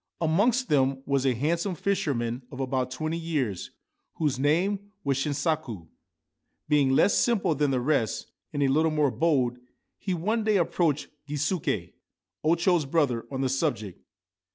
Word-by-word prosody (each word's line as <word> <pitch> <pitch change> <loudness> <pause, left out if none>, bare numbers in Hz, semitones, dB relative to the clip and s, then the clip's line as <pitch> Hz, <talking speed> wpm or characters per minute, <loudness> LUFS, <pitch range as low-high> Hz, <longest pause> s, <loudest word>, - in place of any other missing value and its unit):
Amongst 210 +11 +2
them 135 -2 +2
was 135 -1 +1
a 130 - +2
handsome 170 - 0
fisherman 140 -11 -1
of 130 - -8
about 130 -1 -1
twenty 155 +5 -3
years 140 - -2 0.5
whose 145 -5 0
name 190 +8 +1
was 140 -4 +1
Shinsaku. 140 - -2 0.8
Being 145 -3 +3
less 135 +9 +4
simple 220 -8 +2
than 145 0 +1
the 130 -2 +1
rest, 115 -5 0 0.2
and 145 -2 0
a - - +3
little 155 +4 +3
more 150 -3 +2
bold, 130 -7 +1 0.4
he 185 -3 -2
one 215 +7 0
day 215 -1 +3
approached 165 -4 +1 0.2
Gisuke, 145 - -1 0.5
O 160 +2 +4
Cho's 170 -2 +2
brother, 135 -6 0
on 135 -1 -3
the 135 - +1
subject. 125 - -2
145 Hz, 150 wpm, -27 LUFS, 130-170 Hz, 0.8 s, less